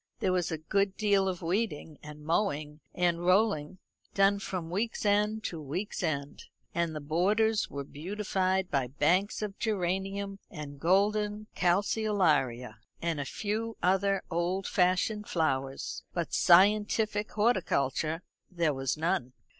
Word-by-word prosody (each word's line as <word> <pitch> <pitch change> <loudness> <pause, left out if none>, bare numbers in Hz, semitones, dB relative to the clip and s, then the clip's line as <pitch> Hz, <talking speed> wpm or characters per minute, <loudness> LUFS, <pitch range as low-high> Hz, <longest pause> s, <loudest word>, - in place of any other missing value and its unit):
There 185 - 0
was 180 -1 0
a 160 - -1
good 195 +5 0
deal 200 -2 +3
of 180 -2 -3
weeding, 165 -4 -2
and 150 0 -11
mowing, 155 -4 -1
and 175 -1 0
rolling 185 -3 +2 0.4
done 195 0 +4
from 180 -4 -5
week's 215 +4 -2
end 210 +1 +2
to 165 -6 -4
week's 170 +9 -4
end; 145 -5 -3 0.3
and 170 -2 -1
the - - -3
borders 205 +9 +1
were 140 0 -5
beautified 190 +4 -1
by 135 -3 +1
banks 175 - +1
of 205 -2 -5
geranium 195 0 -2
and 145 -2 -8
golden 210 +5 +1
calceolaria, 175 - +1 0.2
and 165 -3 -1
a 140 - -2
few 220 - -3
other 195 +1 +2
old 175 +3 -1
fashioned 185 +3 +1
flowers; 135 -5 -1
but 170 -2 -2
scientific 210 +3 +4
horticulture 165 - +1 0.3
there 170 -4 0
was 135 +1 -2
none. 140 -6 -1
185 Hz, 130 wpm, -30 LUFS, 155-205 Hz, 0.4 s, done